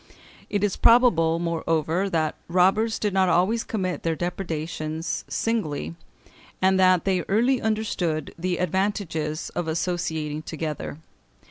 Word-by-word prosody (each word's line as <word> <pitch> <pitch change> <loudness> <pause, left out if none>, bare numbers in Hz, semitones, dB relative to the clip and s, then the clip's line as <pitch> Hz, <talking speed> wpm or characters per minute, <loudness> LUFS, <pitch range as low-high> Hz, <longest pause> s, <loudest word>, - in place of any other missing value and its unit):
It 205 -1 -1
is 205 -3 0
probable, 180 -10 +5
moreover, 165 +2 0
that 160 -3 0
robbers 190 +6 +3
did 210 -2 -1
not 190 -1 +3
always 195 +7 +2
commit 185 -5 -3
their 165 -1 0
depredations 160 -2 -3
singly, 155 - -2 0.7
and 190 0 +3
that 185 -2 +4
they 190 -2 +2
early 240 +6 +2
understood 200 -8 -1
the 175 +1 -2
advantages 180 -4 -1
of 175 -2 -3
associating 160 -2 -2
together. 155 -2 -5
180 Hz, 120 wpm, -25 LUFS, 160-195 Hz, 0.7 s, probable